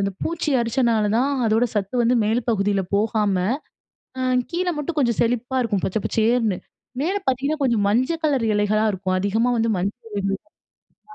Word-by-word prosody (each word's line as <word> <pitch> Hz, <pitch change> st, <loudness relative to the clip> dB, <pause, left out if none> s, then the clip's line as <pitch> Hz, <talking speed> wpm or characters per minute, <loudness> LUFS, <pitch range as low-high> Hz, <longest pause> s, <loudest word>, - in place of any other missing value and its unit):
அந்த 195 Hz, 0 st, 0 dB
பூச்சி 325 Hz, -2 st, -2 dB
அரிச்சனால 230 Hz, -2 st, +1 dB
தான் 270 Hz, +4 st, +2 dB
அதோட 220 Hz, +2 st, +3 dB
சத்து 200 Hz, +2 st, -2 dB
வந்து 235 Hz, +2 st, +3 dB
மேல் 225 Hz, +3 st, +1 dB
பகுதில 200 Hz, -2 st, +1 dB
போகாம, 210 Hz, -1 st, +1 dB, 0.8 s
அ -, -, -2 dB, 0.3 s
கீழே 355 Hz, +1 st, -1 dB
மட்டும் 305 Hz, +2 st, -3 dB
கொஞ்சம் 235 Hz, -5 st, +1 dB
செழிப்பா 245 Hz, +2 st, 0 dB
இருக்கும், 205 Hz, -5 st, -1 dB
பச்சை 215 Hz, +3 st, -1 dB
பச்சைசேருன்னு. 225 Hz, -3 st, +1 dB, 0.4 s
மேல 370 Hz, +6 st, 0 dB
பார்த்தீங்கன்னா, 275 Hz, +4 st, 0 dB
கொஞ்சம் 235 Hz, -6 st, +2 dB
மஞ்சள் 260 Hz, +10 st, +1 dB
கலர் 275 Hz, -6 st, +2 dB
எலைகளா 210 Hz, +1 st, +2 dB
இருக்கும். 185 Hz, 0 st, -1 dB
அதிகமா 220 Hz, +5 st, +1 dB
வந்து 225 Hz, 0 st, +1 dB
மஞ்சள் 210 Hz, +5 st, -4 dB
இலைகள் 195 Hz, -1 st, -2 dB, 0.6 s
ஆமா. 425 Hz, -, -18 dB
230 Hz, 160 wpm, -22 LUFS, 205-260 Hz, 0.8 s, அதோட